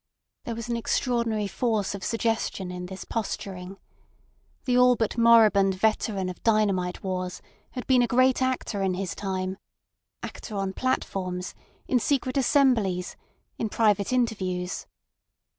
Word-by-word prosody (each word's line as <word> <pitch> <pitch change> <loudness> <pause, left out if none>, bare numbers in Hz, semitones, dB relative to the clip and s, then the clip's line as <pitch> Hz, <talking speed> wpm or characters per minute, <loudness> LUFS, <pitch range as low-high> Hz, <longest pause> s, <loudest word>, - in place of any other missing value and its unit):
There 230 - -3
was 230 0 -6
an 240 - -1
extraordinary 230 -2 0
force 215 -1 -1
of 200 - -7
suggestion 225 -5 -1
in 180 0 -6
this 190 +1 -8
posturing. 195 -3 -4 0.9
The 250 - +2
all 250 0 +6
but 225 -2 -1
moribund 220 -5 +5
veteran 205 -1 0
of 185 - -7
dynamite 200 -5 +1
wars 185 -1 -3 0.3
had 250 - -5
been 255 -2 +4
a 240 - +2
great 255 +2 +3
actor 255 -5 -1
in 190 -1 +1
his 185 -1 -3
time—actor 190 +2 -7
on 195 -1 -2
platforms, 185 -7 -2 0.3
in 250 - +3
secret 255 0 0
assemblies, 240 -10 +2 0.4
in 220 - -1
private 210 -2 +2
interviews. 190 -8 -1
210 Hz, 130 wpm, -26 LUFS, 190-235 Hz, 0.9 s, all